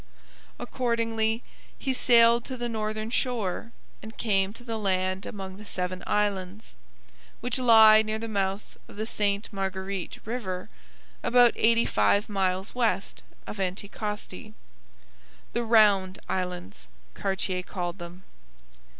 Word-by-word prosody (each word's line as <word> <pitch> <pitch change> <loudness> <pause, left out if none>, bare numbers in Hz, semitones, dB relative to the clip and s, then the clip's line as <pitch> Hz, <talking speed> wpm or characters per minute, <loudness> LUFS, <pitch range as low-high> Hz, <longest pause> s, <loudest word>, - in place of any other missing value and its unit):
Accordingly, 230 -2 -1 0.3
he 265 - -2
sailed 235 -2 +5
to 260 - -5
the 240 0 -2
northern 215 -1 -3
shore 230 -4 -1 0.3
and 220 +1 -11
came 195 -3 +1
to 240 - -14
the 225 -2 -4
land 185 -1 -1
among 190 -2 -7
the 210 - -10
Seven 185 -2 -4
Islands, 205 0 -1 0.7
which 245 +1 -1
lie 220 -3 +8
near 215 0 -2
the 230 +1 -5
mouth 195 -1 -2
of - - -13
the 215 +1 -3
Ste 205 -1 -1
Marguerite 190 -1 -4
river, 205 -6 -4 0.5
about 245 -1 +5
eighty 230 +1 +3
five 105 - +2
miles 190 -1 -1
west 220 -6 -1 0.2
of 210 - -7
Anticosti, 200 - -4 1.0
the 240 - 0
Round 205 -5 +4
Islands, 180 - -4 0.3
Cartier 190 -1 -2
called 180 0 -5
them. 175 +2 -9
210 Hz, 125 wpm, -27 LUFS, 190-230 Hz, 1.0 s, lie